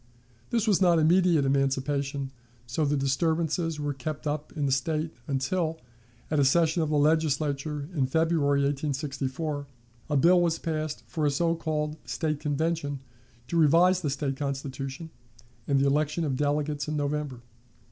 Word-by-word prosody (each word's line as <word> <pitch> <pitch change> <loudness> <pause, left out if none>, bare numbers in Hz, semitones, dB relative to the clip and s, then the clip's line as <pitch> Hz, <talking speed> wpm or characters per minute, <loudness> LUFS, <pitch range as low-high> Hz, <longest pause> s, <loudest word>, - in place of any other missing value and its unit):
This 230 -2 +1
was 200 -3 +3
not 175 -2 +5
immediate 165 -1 +4
emancipation, 135 0 0 0.3
so 120 +6 -1
the 145 0 +1
disturbances 160 +3 0
were 145 -1 -1
kept 140 +3 -5
up 150 0 -3
in 145 - 0
the 135 - +1
State 155 +4 0
until, 160 +4 -1 0.5
at 155 - +2
a - - +5
session 165 +4 +3
of 155 - 0
the 150 - +2
Legislature 150 -1 +1
in 135 -5 +1
February, 150 -1 +2
1864, 140 +1 -2 0.4
a 145 - +2
bill 175 +5 +5
was 165 -1 +1
passed 155 -2 -3
for 155 -3 -1
a - - +4
so 165 +4 +1
called 155 -2 -2
State 155 -3 -2
Convention 150 -1 -1 0.5
to 170 - 0
revise 170 +4 +5
the 150 - -1
State 135 -1 -2
Constitution, 140 +2 -4 0.6
and 140 -1 +3
the 135 - +3
election 150 +4 +1
of 140 -4 0
delegates 145 +1 -1
in 150 0 -2
November. 145 -3 -2
150 Hz, 155 wpm, -27 LUFS, 140-160 Hz, 0.6 s, not